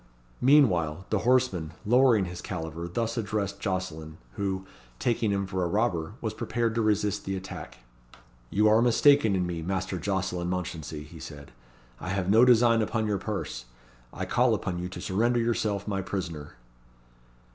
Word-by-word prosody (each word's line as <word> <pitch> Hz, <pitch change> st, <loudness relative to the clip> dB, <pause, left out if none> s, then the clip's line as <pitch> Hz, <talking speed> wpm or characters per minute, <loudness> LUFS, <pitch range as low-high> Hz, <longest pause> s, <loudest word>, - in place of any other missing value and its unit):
Meanwhile 95 Hz, -, +4 dB
the 110 Hz, -, +2 dB
horseman, 110 Hz, -10 st, +1 dB
lowering 120 Hz, -3 st, +4 dB
his 90 Hz, 0 st, -7 dB
caliver, 80 Hz, -1 st, -5 dB
thus 115 Hz, +6 st, -2 dB
addressed 105 Hz, -2 st, -2 dB
Jocelyn, 80 Hz, -5 st, -4 dB, 0.2 s
who, 95 Hz, +1 st, -3 dB, 0.3 s
taking 115 Hz, -, 0 dB
him 100 Hz, -1 st, 0 dB
for 95 Hz, -1 st, -2 dB
a -, -, +1 dB
robber, 85 Hz, -4 st, 0 dB
was -, -, -2 dB
prepared 115 Hz, -1 st, -1 dB
to 115 Hz, -, 0 dB
resist 105 Hz, -1 st, +1 dB
the 95 Hz, -, -3 dB
attack. 90 Hz, -5 st, -8 dB, 0.7 s
"You 105 Hz, -, +3 dB
are 110 Hz, +2 st, +5 dB
mistaken 125 Hz, -2 st, +5 dB
in 90 Hz, -1 st, 0 dB
me, 85 Hz, -2 st, -4 dB
Master 95 Hz, +1 st, -2 dB
Jocelyn 90 Hz, -1 st, -2 dB
Mounchensey," 80 Hz, -4 st, -4 dB
he 75 Hz, -, -12 dB
said; 70 Hz, -2 st, -10 dB, 0.5 s
"I -, -, -6 dB
have 95 Hz, -1 st, 0 dB
no 110 Hz, +3 st, +7 dB
design 120 Hz, -2 st, +5 dB
upon 110 Hz, +1 st, -1 dB
your 105 Hz, -2 st, 0 dB
purse. 95 Hz, -, -4 dB, 0.5 s
I -, -, -4 dB
call -, -, +3 dB
upon 90 Hz, -1 st, -3 dB
you 90 Hz, +1 st, -4 dB
to 95 Hz, -, -8 dB
surrender 115 Hz, +5 st, +1 dB
yourself 110 Hz, -3 st, -1 dB
my 100 Hz, -2 st, -1 dB
prisoner." 85 Hz, -6 st, -5 dB
95 Hz, 160 wpm, -27 LUFS, 90-110 Hz, 0.7 s, no